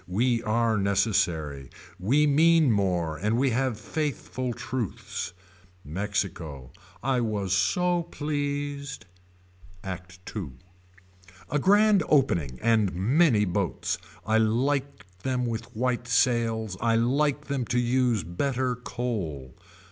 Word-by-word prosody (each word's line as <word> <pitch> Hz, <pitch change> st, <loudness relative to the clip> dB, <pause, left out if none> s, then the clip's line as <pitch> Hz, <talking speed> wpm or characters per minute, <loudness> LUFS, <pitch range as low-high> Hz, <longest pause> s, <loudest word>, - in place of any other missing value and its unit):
We 115 Hz, +6 st, +1 dB
are 115 Hz, -1 st, +1 dB
necessary. 90 Hz, -, 0 dB, 0.3 s
We 135 Hz, +11 st, +3 dB
mean 155 Hz, 0 st, +5 dB
more 90 Hz, -6 st, 0 dB
and 105 Hz, +3 st, 0 dB
we 135 Hz, +1 st, +2 dB
have 125 Hz, -2 st, 0 dB
faithful 130 Hz, -1 st, -3 dB
truths. 120 Hz, -6 st, -4 dB, 0.5 s
Mexico. 80 Hz, -, -3 dB, 0.3 s
I 130 Hz, -1 st, +1 dB
was 105 Hz, -4 st, -1 dB
so 175 Hz, -, +2 dB
pleased. 145 Hz, -3 st, -3 dB, 0.8 s
ACT 90 Hz, -1 st, -7 dB, 0.2 s
II. 90 Hz, -11 st, -4 dB, 1.0 s
A 150 Hz, -, +2 dB
grand 205 Hz, +3 st, +5 dB
opening 85 Hz, -, +2 dB
and 110 Hz, -4 st, +3 dB
many 115 Hz, -, +3 dB
boats. 90 Hz, -, -1 dB, 0.3 s
I 110 Hz, +1 st, +3 dB
like 135 Hz, +5 st, 0 dB, 0.2 s
them 125 Hz, 0 st, -1 dB
with 115 Hz, -1 st, -3 dB
white 125 Hz, +1 st, -1 dB
sails. 115 Hz, -3 st, +1 dB
I 115 Hz, -1 st, +3 dB
like 140 Hz, +5 st, +1 dB
them 140 Hz, -3 st, -1 dB
to 120 Hz, +2 st, -1 dB
use 120 Hz, -3 st, +2 dB
better 125 Hz, -, -1 dB
coal. 95 Hz, -, -4 dB
115 Hz, 110 wpm, -27 LUFS, 100-135 Hz, 1.0 s, mean